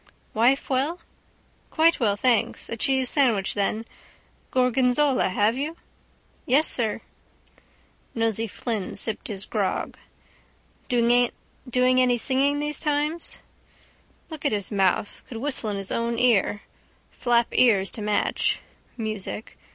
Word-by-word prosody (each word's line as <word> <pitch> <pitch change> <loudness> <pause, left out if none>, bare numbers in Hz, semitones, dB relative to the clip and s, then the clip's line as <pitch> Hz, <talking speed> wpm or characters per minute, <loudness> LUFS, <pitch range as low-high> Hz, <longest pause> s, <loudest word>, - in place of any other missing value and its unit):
—Wife 245 +5 +2
well? 280 +7 0 0.7
—Quite 330 +1 +3
well, 210 -5 +2
thanks... 235 +1 0
A - - -3
cheese 265 +2 +2
sandwich, 235 -9 +2
then. 215 +2 -1 0.6
Gorgonzola, 255 +1 +2
have 210 +4 +1
you? 300 +5 -4 0.7
—Yes, 285 +5 +4
sir. 225 -2 0 1.1
Nosey 225 -1 0
Flynn 215 -2 -4
sipped 215 +1 -3
his 195 -2 -5
grog. 205 -4 -2 0.9
—Doing 245 0 +3 0.7
any 250 -1 +3
singing 275 +4 +2
those 295 0 -2
times? 300 +2 -1 0.9
Look 315 -2 -8
at 285 - +1
his 205 -1 -3
mouth. 195 0 0
Could 235 - -7
whistle 255 -3 0
in 205 - -2
his 195 -1 -5
own 235 0 -1
ear. 220 -4 +2 0.5
Flap 240 -1 +1
ears 200 -7 +3
to 220 - -6
match. 210 0 0 0.4
Music. 215 -1 -4
235 Hz, 120 wpm, -24 LUFS, 210-270 Hz, 1.1 s, Yes